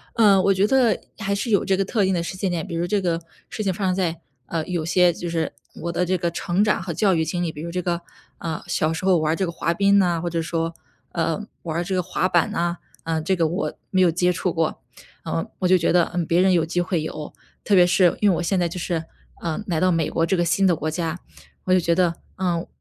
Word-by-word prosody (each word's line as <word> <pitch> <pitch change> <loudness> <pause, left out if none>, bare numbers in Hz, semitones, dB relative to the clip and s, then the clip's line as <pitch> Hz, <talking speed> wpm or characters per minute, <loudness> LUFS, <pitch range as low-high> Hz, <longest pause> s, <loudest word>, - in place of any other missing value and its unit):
嗯， 200 -5 +5
我 195 - +4
觉 195 +2 +2
得 250 -2 +3 0.2
还 200 -3 -2
是 200 +4 -2
有 205 -3 +3
这 195 - +2
个 195 - +1
特 205 +1 0
定 190 - +1
的 175 - 0
时 185 +2 -5
间 190 -1 -1
点， 175 +1 -2
比 170 - -5
如 170 +1 0
这 200 +3 0
个 170 -3 0 0.3
事 215 - -4
情 195 -2 0
发 195 +2 -3
生 185 -1 +1
在， 170 -3 -1 0.3
呃， 165 +3 -2
有 175 -4 -2
些 180 +1 +4
就 175 - -6
是 165 -2 -1 0.3
我 170 - -2
的 180 +1 0
这 185 +1 +1
个 170 0 0
成 175 +3 0
长 210 - +1
和 180 -3 -4
教 190 +1 +2
育 160 - +1
经 175 +1 -2
历。 165 - -1
比 150 - -9
如 170 - -5
这 180 +1 -2
个， 175 -1 -1 0.4
啊， 160 -2 -4
小 155 +1 0
时 175 - -4
候 185 -2 +5
玩 155 -1 +1
儿 - - 0
这 190 - -1
个 170 - -1
滑 170 0 -1
冰 200 +3 +4
呐， 175 -4 +2
或 175 - -2
者 170 0 -2
说， 165 0 -2 0.4
呃， 165 +2 0 0.2
玩 160 -2 -4
儿 - - 0
这 190 +2 -2
个 180 - +1
滑 185 +1 -1
板 175 -2 +2
呐， 170 +1 -1 0.3
嗯， 160 -1 -1
这 190 +4 +1
个 165 -3 +2
我 175 +6 -2 0.2
没 185 - +2
有 180 -2 +5
接 180 +2 +2
触 180 0 -1
过。 165 -1 -1 0.4
嗯， 80 +1 -2
我 185 - +1
就 185 +1 +5
觉 165 - +1
得， 175 0 +5
嗯， 175 -1 0
别 170 - +3
人 190 0 +4
有 170 -2 +3
机 165 +2 -1
会 175 -2 0
有， 155 -1 -6 0.3
特 210 - 0
别 180 -2 +7
是 180 -1 +4
因 210 - +5
为 185 - +3
我 - - -2
现 185 +2 +1
在 175 - +1
就 175 - -7
是， 170 -2 -2 0.4
嗯， 170 +5 -2
来 170 -4 0
到 185 +1 +3
美 165 -3 0
国 165 - +1
这 190 0 +1
个 175 - +2
新 180 +4 +3
的 175 - +3
国 155 +1 -3
家。 165 +1 -3 0.5
我 185 - +2
就 185 - +5
觉 170 -1 +1
得， 175 -2 +2 0.2
嗯， 175 -3 -1
175 Hz, 295 characters per minute, -23 LUFS, 165-190 Hz, 0.5 s, 别